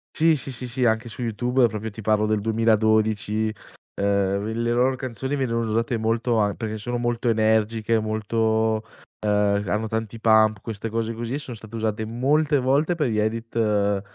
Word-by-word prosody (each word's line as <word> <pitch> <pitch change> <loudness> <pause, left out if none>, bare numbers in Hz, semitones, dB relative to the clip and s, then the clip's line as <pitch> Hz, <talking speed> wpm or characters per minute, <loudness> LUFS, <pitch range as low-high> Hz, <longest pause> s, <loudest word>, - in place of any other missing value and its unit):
Sì, 160 0 +4
sì, 135 -1 -4
sì, 125 0 -5
sì, 125 +1 -2
anche 110 +1 +1
su 115 - -8
YouTube 120 +2 +1
proprio 110 0 -5
ti 110 - -9
parlo 110 0 +2
del 105 -1 0
2012. 110 -1 +1 0.4
Ehm, 100 0 0
il 110 +1 -2
le 120 - 0
loro 125 +2 +2
canzoni 130 +2 -4
venivano 115 -4 -1
usate 115 +2 0
molto 115 +1 0
an 105 -1 +1
perché 110 -2 -4
sono 120 +3 -3
molto 120 0 -1
energiche, 110 0 +2
molto, 110 0 0 0.5
ehm, 105 0 +2
c - - -9
hanno 110 +2 -1
tanti 110 +1 -4
pump, 110 -2 +4
queste 115 0 -5
cose 115 +1 -2
così, 115 +2 -4
e - - -2
sono 130 -4 -6
state 110 +1 -11
usate 110 -1 -2
molte 140 +6 +1
volte 140 +6 +2
per 150 -4 0
gli 110 - -1
edit, 115 +2 -2
ehm, 105 -3 +1
110 Hz, 185 wpm, -24 LUFS, 110-120 Hz, 0.5 s, Sì